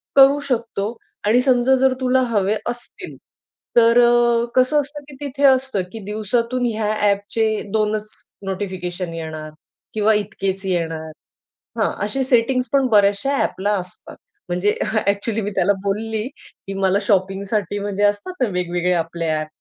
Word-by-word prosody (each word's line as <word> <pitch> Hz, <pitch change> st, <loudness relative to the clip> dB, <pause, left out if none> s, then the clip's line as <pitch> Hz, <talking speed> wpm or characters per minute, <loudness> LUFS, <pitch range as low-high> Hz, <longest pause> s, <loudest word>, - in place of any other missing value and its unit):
करू 275 Hz, +1 st, +7 dB
शकतो 230 Hz, -3 st, -2 dB, 0.3 s
आणि 235 Hz, +4 st, +4 dB
समजा 255 Hz, 0 st, +3 dB
जर 265 Hz, 0 st, +3 dB
तुला 255 Hz, 0 st, +3 dB
हवे 210 Hz, -2 st, +1 dB
असतील, 240 Hz, 0 st, -7 dB, 0.6 s
तर 230 Hz, 0 st, +6 dB
अ, 240 Hz, -1 st, +4 dB
कसं 255 Hz, +4 st, +4 dB
असतं 290 Hz, +1 st, -8 dB
की -, -, -11 dB
तिथे 285 Hz, 0 st, -4 dB
असतं, 260 Hz, -6 st, +2 dB
की 225 Hz, -, -7 dB
दिवसातून 230 Hz, +4 st, -1 dB
ह्या 215 Hz, -1 st, -1 dB
अ‍ॅपचे 205 Hz, +1 st, +1 dB, 0.3 s
2च 215 Hz, 0 st, 0 dB, 0.3 s
नोटिफिकेशन 185 Hz, -2 st, -4 dB
येणार 155 Hz, -2 st, -6 dB, 0.4 s
किंवा 220 Hz, 0 st, +3 dB
इतकेच 195 Hz, -2 st, -2 dB
येणार. 165 Hz, -3 st, -2 dB, 0.7 s
हां, 215 Hz, -, +2 dB
असे 265 Hz, +6 st, 0 dB
सेटिंग्स 255 Hz, 0 st, +2 dB
पण 275 Hz, -2 st, +4 dB
बऱ्याचश्या 205 Hz, +6 st, +3 dB
अ‍ॅपला 205 Hz, +2 st, 0 dB
असतात. 180 Hz, -1 st, -6 dB, 0.3 s
म्हणजे 180 Hz, +4 st, +1 dB
अ‍ॅक्चुअली 215 Hz, +1 st, 0 dB
मी 205 Hz, 0 st, -3 dB
त्याला 200 Hz, +3 st, +3 dB
बोलली 215 Hz, +2 st, -2 dB, 0.4 s
की 195 Hz, -, -4 dB
मला 195 Hz, 0 st, +2 dB
शॉपिंगसाठी 200 Hz, 0 st, 0 dB
म्हणजे 205 Hz, 0 st, -2 dB
असतात 205 Hz, -, +1 dB
ना, -, -, +2 dB
वेगवेगळे 180 Hz, -1 st, 0 dB
आपले 165 Hz, 0 st, -2 dB
अ‍ॅप 155 Hz, 0 st, -1 dB
210 Hz, 140 wpm, -20 LUFS, 190-240 Hz, 0.7 s, करू